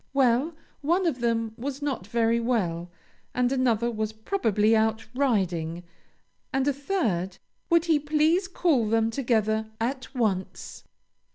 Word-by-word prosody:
Well, 270 +4 +3 0.3
one 345 +6 +1
of 300 -7 0
them 230 -2 0
was 275 +2 -4
not 270 -10 -3
very 230 +1 +2
well, 180 -8 -1 0.5
and 250 0 +2
another 240 -3 +1
was 215 -1 -3
probably 220 - +1
out 220 0 +1
riding, 180 - 0 0.7
and 270 +1 0
a 285 - +3
third 225 - -1 0.3
Would 335 -1 +4
he 320 -3 +3
please 310 +5 +2
call 315 - +1
them 225 0 +2
together 220 -3 0
at 255 +3 -3
once? 205 -6 -2
235 Hz, 130 wpm, -26 LUFS, 220-280 Hz, 0.7 s, Would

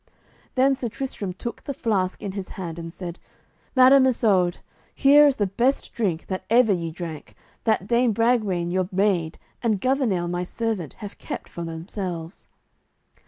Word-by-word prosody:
Then 270 +1 +4
Sir 255 -3 -3
Tristram 220 -6 -4
took 235 +6 -6
the 280 - -5
flask 190 -6 -1
in 200 - -3
his 190 -1 -6
hand, 170 -3 -5
and 165 0 -6
said: 175 0 -7 0.6
"Madam 260 +1 +7
Isoud, 195 -8 +2 0.4
here 290 +1 +7
is 280 - +2
the 205 - +1
best 240 +8 0
drink 185 -8 -1
that 185 -1 -4
ever 230 -2 +5
ye 170 -2 -2
drank, 160 -2 -8 0.3
that 220 -4 +2
Dame 235 +2 +3
Bragwaine 210 -6 +1
your 185 0 0
maid 185 -4 +1 0.2
and 220 -5 +1
Gouvernail 240 -8 +1
my 175 +1 -2
servant 200 - -3
have 200 - -10
kept - - -6
for 170 - -6
themselves." 170 +1 -5
200 Hz, 160 wpm, -24 LUFS, 175-240 Hz, 0.6 s, Madam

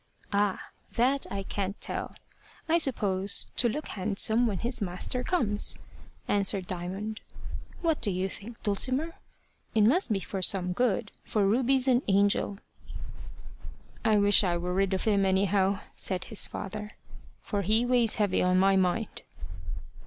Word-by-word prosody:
"Ah! 200 -1 +1 0.3
that 260 +4 +1
I 195 0 -4
can't 195 0 -4
tell. - - -4 0.6
I 335 +1 +3
suppose 200 - +1
to 240 - +3
look 300 +7 -4
handsome 220 +5 +2
when 205 -4 -2
his 235 +4 -2
master 200 +7 -2
comes," 220 - 0 0.5
answered 200 -1 +1
Diamond. 190 +5 -5 0.6
"What 325 -2 +1
do 215 - +1
you 185 0 -1
think, 225 +4 -8
Dulcimer? 255 +9 +1 0.7
It 215 - +4
must 265 - +3
be 200 - +1
for 190 0 -5
some 180 -1 +1
good, 215 -1 0
for 210 -2 0
Ruby's 260 +5 +3
an 250 -1 +4
angel." 200 0 +2 1.5
"I 215 -1 +4
wish 205 0 +5
I 175 -2 +1
were 180 +1 -3
rid 195 0 +1
of 185 - -3
him, 205 -3 +2
anyhow," 195 0 +2
said 185 -2 -2
his 220 - +3
father; 210 +1 -6 0.5
"for 205 -2 -3
he 215 +5 +2
weighs 245 -3 +3
heavy 205 -4 +1
on 180 0 +3
my 195 +1 +4
mind." 190 +4 0
205 Hz, 145 wpm, -28 LUFS, 190-235 Hz, 1.5 s, wish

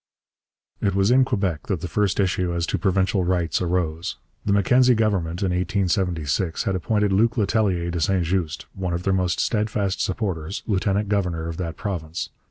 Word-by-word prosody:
It 100 -2 +1
was 100 +3 +3
in 130 +1 +6
Quebec 95 - -1
that 95 -6 -1
the 90 - -3
first 100 +3 0
issue 90 -2 +1
as 85 -1 0
to - - -2
provincial 95 -1 +1
rights 90 -2 0
arose. 90 +2 -1 0.3
The 105 - 0
Mackenzie 125 +6 +4
Government 100 -5 0
in 95 - +1
1876 90 -3 0
had 95 - 0
appointed 105 +2 +1
Luc 115 +4 +3
Letellier 100 -5 +1
de 85 -1 -2
St 95 0 +2
Just, 85 -2 -2
one 90 -2 -3
of 85 - -4
their 95 - +1
most 90 -2 0
steadfast 105 -3 0
supporters, 95 -3 -2
lieutenant 100 0 0
governor 90 -5 -1
of 85 -1 -5
that 85 -3 -4
province. 85 -6 -4
95 Hz, 175 wpm, -23 LUFS, 85-100 Hz, 0.3 s, in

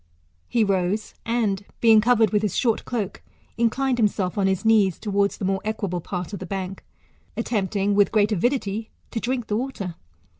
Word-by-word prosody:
He 235 - +2
rose, 195 +1 0
and, 215 -4 0 0.2
being 225 -2 +6
covered 225 -3 +4
with 210 - +2
his 210 -4 -1
short 230 -4 +1
cloke, 215 -6 -3 0.3
inclined 245 +2 +1
himself 200 -4 +1
on 200 -2 +2
his 190 +2 0
knees 210 -5 +4
towards 200 -1 0
the - - -3
more 195 0 0
equable 200 -5 -2
part 180 +3 -5
of 200 - -4
the 185 - -7
bank, 190 0 -5 0.5
attempting, 205 -3 0
with 200 -1 +4
great 215 -1 +3
avidity, 220 0 0 0.2
to 230 - -2
drink 245 0 -2
the 210 - -1
water. 225 -8 -4
210 Hz, 175 wpm, -24 LUFS, 195-230 Hz, 0.5 s, being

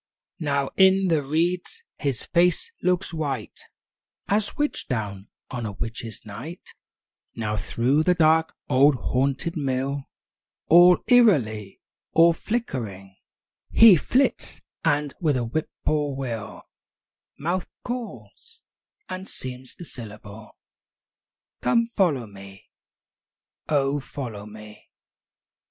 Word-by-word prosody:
II 160 - -5
Now 140 -1 0
in 190 0 +5
the 160 -3 +2
reeds 175 - -1 0.2
his 140 -6 -2
face 175 -1 +2
looks 180 0 0
white 140 -8 -4 0.7
As 205 +1 0
witch 295 0 -2
down 105 -4 -4 0.2
on 120 -3 -3
a 105 - -6
witches' 115 +1 -6
night; 155 - -9 0.7
Now 105 -2 -2
through 120 +8 +1
the 180 +3 +3
dark, 160 -1 +3
old, 140 +1 +5
haunted 135 - -1
mill, 135 -1 -2 0.6
All 175 +2 +7
eerily, 125 - +3 0.3
all 165 +1 +6
flickeringly 115 - -4 0.5
He 225 -4 +8
flits; 255 - 0 0.2
and 145 -3 +1
with 150 -5 +2
a 120 - -1
whippoorwill 135 -2 -3 0.7
Mouth 175 +5 -2 0.2
calls, 255 - -8 0.4
and 185 +1 -6
seems 130 0 -8
to 175 - -10
syllable, 105 -4 -11 1.0
"Come 235 -1 +3
follow 175 - +1
me! 100 -2 -14 1.0
oh, 145 -1 +1
follow 120 -7 -7
me!" 105 0 -13
140 Hz, 105 wpm, -24 LUFS, 115-175 Hz, 1.0 s, He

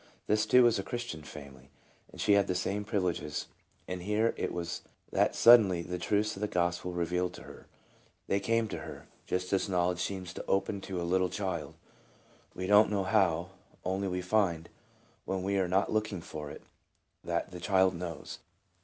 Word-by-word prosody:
This 105 0 +2
too 125 0 +7
was 120 -4 +4
a - - -2
Christian 120 -10 -5
family, 70 -2 -11 0.4
and - - -13
she 105 - +3
had 100 -1 +4
the 90 - -1
same 100 +3 -1
privileges, 90 -8 -2 0.4
and 90 -1 -4
here 105 +4 +1
it - - -2
was 85 -1 -4 0.3
that - - +2
suddenly 105 -8 +7
the 90 +1 -4
truths 105 +4 0
of 95 - -9
the 105 - +1
gospel 90 -1 0
were 90 - -6
revealed 90 +1 -1
to - - -10
her. - - -13 0.6
They 100 - +1
came 115 +1 +1
to - - -4
her, - - -9 0.2
just 90 +1 -2
as 95 +1 +1
knowledge 90 -1 +1
seems 95 -1 -4
to - - -7
open 95 +1 0
to 95 -2 -4
a - - -2
little 90 +1 +1
child, 95 -5 -3 0.8
we 90 - -3
do 105 +2 +7
n't 110 - +4
know 100 -2 0
how, 90 -4 +2 0.4
only 95 +2 -1
we 90 -1 -2
find, 90 -4 +1 0.6
when 95 -1 -2
we 100 +1 +1
are 95 - +1
not 95 +4 +1
looking 110 -4 -1
for 75 -2 -7
it, - - -10 0.6
that - - -2
the 90 - -7
child 95 +1 +3
knows. 85 -2 -6
95 Hz, 190 wpm, -31 LUFS, 90-100 Hz, 0.8 s, too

